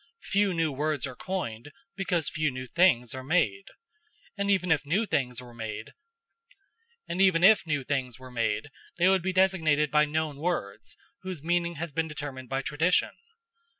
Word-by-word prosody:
Few 200 0 +2
new 165 -3 0
words 150 0 -1
are 130 -2 -7
coined, 145 -9 -5 0.2
because 180 -5 -1
few 155 -1 0
new 130 -1 -6
things 125 -5 +3
are 130 0 -6
made; 120 - +1 0.7
and 200 -1 -2
even 185 -3 +2
if 150 -3 +3
new 180 +10 +1
things 125 - -1
were 125 -1 -11
made, 110 -2 -6 1.1
they 145 - +1
would 190 -1 +4
be 190 +2 -1
designated 165 -6 +2
by 150 0 +5
known 155 -1 -2
words, 145 - -3 0.2
whose 185 -6 -6
meaning 170 0 0
has 165 +1 -5
been 160 +3 -1
determined 140 -4 -7
by 135 +1 -1
tradition. 160 +6 +2
150 Hz, 140 wpm, -28 LUFS, 130-180 Hz, 1.1 s, by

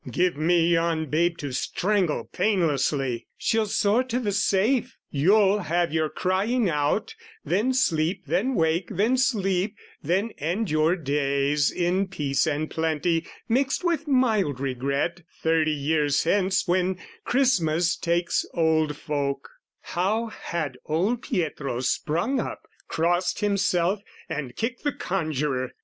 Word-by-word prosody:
"Give 180 -2 +1
me 165 +2 +2
yon 165 -3 0
babe 170 +2 +2
to 145 -2 -5
strangle 180 - 0
painlessly! 140 - 0
"She'll 220 -1 +1
soar 205 +4 +2
to 250 -1 -1
the 215 -5 -1
safe: 210 +6 +1
you'll 195 +7 +4
have 175 -2 0
your 160 -1 +1
crying 205 +8 0
out, 150 +4 0 0.3
"Then 210 +8 +1
sleep, 175 -5 +1
then 255 +7 0
wake, 165 +1 +1
then 215 +5 +1
sleep, 200 -5 +1 0.3
then 190 +9 0
end 175 +5 -1
your 155 +3 +3
days 140 -2 +1
"In 185 +2 0
peace 145 -8 0
and 155 0 -1
plenty, 160 +1 0 0.2
mixed 270 +7 +1
with 335 -3 0
mild 220 - +2
regret, 140 +6 -1 0.2
"Thirty 160 -1 +3
years 145 -1 +1
hence 190 +2 +1
when 185 +1 +1 0.3
Christmas 175 - +2
takes 170 0 0
old 160 -3 +2
folk" 140 -2 -2 0.3
How 215 +6 -1
had 155 -11 -4
old 195 +10 0
Pietro 150 - -2
sprung 170 - 0
up, - - -4 0.3
crossed 175 +5 0
himself, 195 -2 +1 0.3
And 135 -5 -5
kicked 235 +2 -3
the 290 - 0
conjuror! 150 -8 -2
175 Hz, 130 wpm, -25 LUFS, 150-205 Hz, 0.3 s, you'll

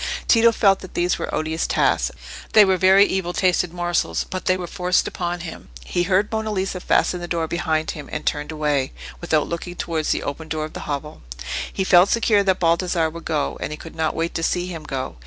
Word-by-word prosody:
Tito 230 0 +6
felt 195 -3 +3
that 185 - -12
these 175 +1 +1
were - - -4
odious 160 +1 -1
tasks; - - +2 0.4
they 215 -1 +8
were 190 -1 +3
very 190 +2 +6
evil 185 -3 -2
tasted 180 -2 +1
morsels, 175 0 -1
but 185 0 -4
they 185 - +2
were 180 - -5
forced 180 +1 0
upon 175 -1 -3
him. 170 -2 -8 0.2
He 175 - -1
heard 190 +3 +1
Monna 220 -1 -2
Lisa 190 -2 -2
fasten 180 0 +1
the 175 - -6
door 165 -1 -1
behind 160 -2 -1
him, 150 -3 -9
and 155 - -4
turned 150 +1 -1
away, 150 -3 -1 0.3
without 155 - +1
looking 175 +1 -5
towards 160 -3 -2
the - - 0
open 155 +3 -5
door 155 -1 -2
of 155 - -10
the - - -7
hovel. 150 +1 -5 0.5
He 190 - -1
felt 185 0 +6
secure 225 -3 +3
that 190 -2 +1
Baldassarre 170 -1 +1
would 170 +1 -10
go, 150 -3 -1
and - - -3
he 150 - -5
could 165 - -11
not 160 -1 -1
wait 165 +1 -2
to - - -2
see 175 +2 0
him 165 -4 -7
go. 130 - -4
175 Hz, 220 wpm, -22 LUFS, 160-185 Hz, 0.5 s, they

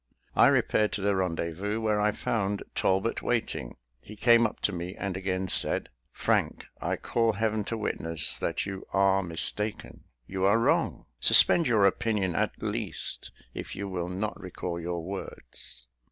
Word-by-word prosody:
I - - +7
repaired 105 -1 +2
to 100 - -2
the 100 0 +2
rendezvous, 95 +3 -2
where 110 -2 +1
I 105 0 +3
found 100 -2 -2
Talbot 95 +4 +1
waiting. 110 - -2 0.2
He 105 - -11
came 115 +2 +5
up - - -11
to - - +1
me, 90 +1 -5
and 100 -2 -3
again 95 0 -2
said, - - +3 0.2
"Frank, - - 0 0.2
I - - 0
call 115 -1 +1
heaven 110 0 0
to 115 - -3
witness 80 -7 -1
that - - -2
you 95 -1 -5
are 95 0 +4
mistaken. 100 +5 -1 0.2
You 95 +6 -4
are 100 +3 +5
wrong. 115 - +1
Suspend 170 - +6
your 110 -4 +4
opinion, 100 -2 +1
at - - -2
least, - - -3 0.2
if - - -6
you 100 - -4
will 90 -2 -3
not 100 +4 -3
recall 90 -2 -5
your 85 0 -3
words." 90 -8 -7
100 Hz, 160 wpm, -28 LUFS, 90-105 Hz, 0.2 s, I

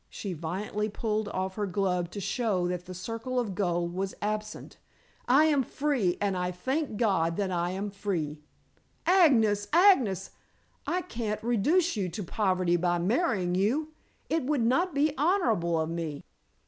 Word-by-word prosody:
She 195 -3 -5
violently 195 +6 -3
pulled 215 0 -2
off 190 0 -3
her 205 0 -2
glove 180 -2 0
to 200 - -7
show 200 -4 0
that 180 0 -4
the 185 - -6
circle 230 +6 -3
of 220 -5 -2
gold 175 -3 -1
was 190 +1 -3
absent. 215 0 -4 0.5
"I 270 +5 +6
am 295 -3 +3
free, 255 -9 0
and 200 -2 0
I 180 0 -1
thank 260 - -2
God 180 -7 +1
that 195 -2 -1
I 175 -1 0
am 195 +3 -3
free." 170 -7 -3 0.7
"Agnes! 230 - +4
Agnes! 265 - +4 0.6
I 360 +1 0
can't 225 -10 -4
reduce 295 - +2
you 195 -4 -1
to 185 +5 -5
poverty 185 -2 +1
by 175 0 +1
marrying 190 - +1
you. 235 +12 +1 0.4
It 325 -2 0
would 275 -4 +1
not 330 +7 +1
be 290 +1 +2
honorable 230 - +2
of 160 +1 -1
me." 165 -4 -4
205 Hz, 160 wpm, -28 LUFS, 180-255 Hz, 0.7 s, I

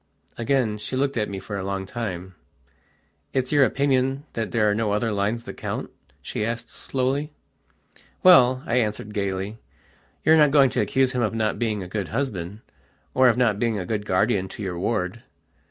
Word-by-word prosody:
Again 115 -3 0
she 130 - -4
looked 140 +1 0
at 105 -3 -1
me 100 - -5
for 100 +2 -6
a 95 - -4
long 95 0 -3
time. 95 -4 -5 1.0
"It's 130 -1 0
your 145 -2 +5
opinion 135 0 +1
that 110 -2 -2
there 110 -2 +2
are 105 - +3
no 105 -1 0
other 110 +2 0
lines 105 +3 -1
that - - -9
count?" - - -4 0.3
she - - -3
asked 115 +2 -3
slowly. 135 +3 -2 0.9
"Well," 130 -8 +7
I 120 - 0
answered 105 -2 -1
gaily, 100 +1 -3 0.7
"you're 160 +1 +6
not 150 -2 +6
going 140 -3 +5
to - - +1
accuse 130 +5 +2
him 125 -1 -1
of 110 -1 0
not 110 -1 0
being 110 -4 -1
a - - -7
good 100 +1 -3
husband, 105 -6 -3 0.5
or 130 -1 +5
of 115 - +1
not 115 -5 +2
being 115 -2 0
a 90 - -3
good 105 0 -3
guardian 95 0 +2
to 105 - -8
your 90 -3 -3
ward?" 105 +1 -1
115 Hz, 185 wpm, -24 LUFS, 100-130 Hz, 1.0 s, Well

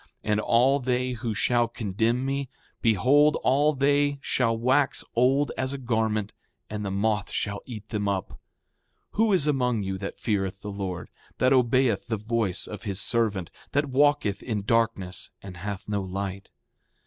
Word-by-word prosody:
And 105 0 +1
all 125 +6 +3
they 125 0 0
who 115 -2 -3
shall 120 +2 +2
condemn 115 +2 -1
me, 135 -1 -2 0.3
behold, 130 +8 +4
all 145 +4 +3
they 145 +1 +2
shall 115 -3 +1
wax 130 +4 +2
old 135 +4 +3
as 130 +1 -1
a - - -3
garment, 110 -4 -1 0.4
and 105 -1 -3
the 100 - -2
moth 105 +1 0
shall 100 -1 -3
eat 110 -4 -8
them 105 -2 -2
up. 100 -2 -1
7:10 - - -12 0.7
Who 220 +1 +2
is 180 -6 +4
among 125 -7 +1
you 95 0 -3
that 100 - -6
feareth 95 -3 -1
the 105 - -5
Lord, 95 -3 -5 0.3
that 130 +1 +4
obeyeth 125 -4 +2
the 110 - -1
voice 110 -3 -1
of 105 -3 -8
his 100 -3 -3
servant, 105 -8 0 0.2
that 145 0 +1
walketh 135 -7 +2
in 105 -4 -3
darkness 105 -4 0
and 95 -2 -9
hath 100 +2 -5
no 105 -1 -1
light? 95 +1 -5
115 Hz, 165 wpm, -26 LUFS, 100-130 Hz, 0.7 s, behold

